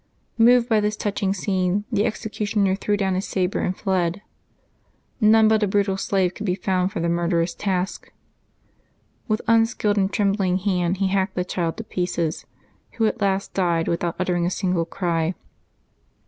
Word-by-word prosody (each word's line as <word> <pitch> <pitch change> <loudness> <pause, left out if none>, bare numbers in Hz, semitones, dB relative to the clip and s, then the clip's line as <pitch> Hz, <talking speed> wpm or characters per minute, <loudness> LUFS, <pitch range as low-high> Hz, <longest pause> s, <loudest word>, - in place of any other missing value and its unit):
Moved 240 +1 +5
by 220 -3 +3
this 210 0 0
touching 200 -2 -1
scene, 190 0 0
the 210 -1 +1
executioner 210 -2 -1
threw 205 +1 -1
down 195 -2 0
his 185 +1 -2
sabre 185 0 -1
and 185 - -2
fled. 190 -1 -1 1.0
None 220 0 +5
but 220 0 +3
a 210 - +2
brutal 195 0 +1
slave 190 -1 0
could 210 - -6
be 180 - +1
found 185 -2 0
for - - -4
the 170 - 0
murderous 170 0 0
task; 190 -1 -3 1.2
with 215 -2 -1
unskilled 225 -2 +2
and 195 0 +1
trembling 195 -3 +1
hand 185 -2 0
he 195 0 0
hacked 190 0 0
the 180 - -1
child 170 -3 -2
to 225 - -5
pieces, 175 -5 -3 0.5
who 225 - 0
at 220 +1 -1
last 195 -1 0
died 170 -3 +1
without 170 0 -1
uttering 175 -1 0
a - - +1
single 180 -2 -1
cry. 170 -1 -1
190 Hz, 165 wpm, -23 LUFS, 180-210 Hz, 1.2 s, Moved